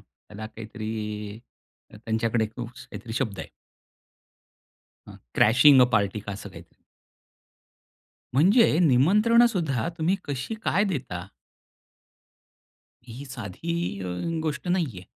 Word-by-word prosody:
त्याला 110 Hz, +1 st, -11 dB
काहीतरी 110 Hz, -1 st, -6 dB, 0.6 s
त्यांच्याकडे 110 Hz, +1 st, -1 dB
काहीतरी 120 Hz, -2 st, -8 dB
शब्द 110 Hz, -5 st, -2 dB
आहे. -, -, -6 dB, 1.6 s
अ, -, -, -10 dB, 0.2 s
क्रॅशिंग 130 Hz, +5 st, +6 dB
अ 125 Hz, -, +8 dB
पार्टी 105 Hz, 0 st, +1 dB
का 100 Hz, -, -6 dB
असं 100 Hz, -, -8 dB
काहीतरी -, -, -15 dB, 1.5 s
म्हणजे 185 Hz, -, +5 dB
निमंत्रण 200 Hz, -, +5 dB
सुद्धा 145 Hz, -, -1 dB
तुम्ही 170 Hz, +5 st, +1 dB
कशी 140 Hz, -, -3 dB
काय 205 Hz, -, +2 dB
देता? 100 Hz, -, -5 dB, 1.8 s
ही 125 Hz, +5 st, -8 dB
साधी 130 Hz, -, -4 dB
अ, 95 Hz, -, -5 dB, 0.4 s
गोष्ट 155 Hz, +3 st, -3 dB
नाहीये. 160 Hz, -, -1 dB
120 Hz, 100 wpm, -25 LUFS, 110-160 Hz, 1.8 s, अ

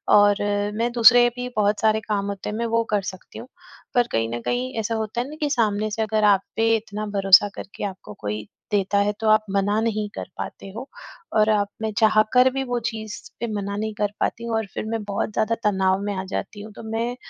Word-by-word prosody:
और 205 Hz, 0 st, +6 dB, 0.4 s
मैं 235 Hz, +2 st, 0 dB
दूसरे 240 Hz, +1 st, +7 dB
भी 250 Hz, 0 st, -3 dB
बहुत 205 Hz, 0 st, +2 dB
सारे 220 Hz, 0 st, +3 dB
काम 205 Hz, -2 st, -2 dB
होते 200 Hz, -1 st, -4 dB
हैं 210 Hz, -, -4 dB
मैं 235 Hz, -, -1 dB
वो 230 Hz, 0 st, +1 dB
कर 205 Hz, -1 st, +2 dB
सकती 185 Hz, -1 st, -8 dB
हूँ। -, -, -9 dB, 0.5 s
पर 240 Hz, -1 st, +4 dB
कहीं 115 Hz, 0 st, 0 dB
न -, -, -3 dB
कहीं 250 Hz, -, -2 dB
ऐसा 225 Hz, +1 st, -1 dB
होता 220 Hz, +1 st, -2 dB
है 250 Hz, -, -5 dB
ना 305 Hz, -, -8 dB
कि 295 Hz, -, +1 dB
सामने 215 Hz, -5 st, +1 dB
से 220 Hz, -, -2 dB
अगर 215 Hz, 0 st, 0 dB
आप 200 Hz, -2 st, +5 dB
पे 225 Hz, 0 st, +3 dB
इतना 215 Hz, -1 st, -6 dB
भरोसा 195 Hz, +1 st, +6 dB
करके 195 Hz, -, -8 dB
आपको 185 Hz, -, -7 dB
कोई 105 Hz, 0 st, -3 dB, 0.3 s
देता 200 Hz, -1 st, +1 dB
है 200 Hz, +1 st, +2 dB
तो 220 Hz, -, +2 dB
आप 215 Hz, 0 st, +4 dB
मना 200 Hz, +2 st, +1 dB
नहीं 215 Hz, -2 st, -1 dB
कर -, -, -6 dB
पाते 195 Hz, -, -7 dB
हो। 250 Hz, +4 st, -6 dB, 0.5 s
और 215 Hz, 0 st, +4 dB
आप 205 Hz, -1 st, +1 dB
मैं 220 Hz, 0 st, -1 dB
चाह 215 Hz, -1 st, +5 dB
कर 250 Hz, +1 st, +6 dB
भी 270 Hz, 0 st, -1 dB
वो 245 Hz, -1 st, -1 dB
चीज़ 220 Hz, -2 st, -7 dB, 0.2 s
पे 235 Hz, -, -2 dB
मना 200 Hz, -1 st, -3 dB
नहीं 215 Hz, +1 st, -2 dB
कर 205 Hz, -1 st, +1 dB
पाती 230 Hz, -, -1 dB
हूँ 230 Hz, -1 st, -1 dB
और 220 Hz, -, -1 dB
फिर -, -, -4 dB
मैं 225 Hz, 0 st, -3 dB
बहुत 205 Hz, +1 st, -2 dB
ज़्यादा 225 Hz, +2 st, +1 dB
तनाव 190 Hz, -2 st, +2 dB
में 205 Hz, 0 st, -2 dB
आ 190 Hz, -, -3 dB
जाती 205 Hz, +1 st, -4 dB
हूँ। 215 Hz, +1 st, -9 dB
तो -, -, -10 dB
मैं 230 Hz, +2 st, -1 dB
215 Hz, 235 wpm, -23 LUFS, 205-230 Hz, 0.5 s, दूसरे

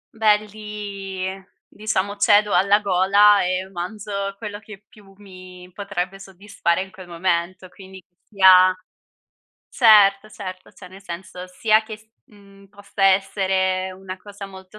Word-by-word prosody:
Beh, 215 Hz, -2 st, +4 dB
lì 200 Hz, -3 st, -7 dB, 0.4 s
diciamo 205 Hz, -1 st, -3 dB
cedo 205 Hz, 0 st, +3 dB
alla 200 Hz, +3 st, +4 dB
gola 200 Hz, +2 st, +4 dB
e 185 Hz, +1 st, -2 dB
manzo 200 Hz, +2 st, -5 dB
quello 210 Hz, -1 st, -7 dB
che 210 Hz, -1 st, -14 dB
più 200 Hz, -2 st, -20 dB
mi 185 Hz, -2 st, -14 dB
potrebbe 195 Hz, -1 st, -5 dB
soddisfare 195 Hz, -2 st, -3 dB
in 190 Hz, -, -15 dB
quel 185 Hz, -1 st, -13 dB
momento. 175 Hz, +1 st, -2 dB
Quindi 190 Hz, +1 st, -14 dB, 0.2 s
sia 185 Hz, -2 st, +5 dB, 1.0 s
certo, 215 Hz, -3 st, +4 dB
certo, 185 Hz, -3 st, -9 dB
cioè 185 Hz, -, -14 dB
nel 190 Hz, +2 st, -15 dB
senso, 180 Hz, 0 st, -9 dB
sia 215 Hz, +4 st, +2 dB
che 220 Hz, -1 st, -9 dB
s 215 Hz, -, -24 dB, 0.3 s
mhmm, 200 Hz, -1 st, -19 dB
possa 200 Hz, 0 st, -4 dB
essere 190 Hz, -1 st, +1 dB
una 185 Hz, 0 st, -9 dB
cosa 200 Hz, +1 st, -11 dB
molto 190 Hz, +1 st, -14 dB
195 Hz, 135 wpm, -21 LUFS, 185-205 Hz, 1.0 s, sia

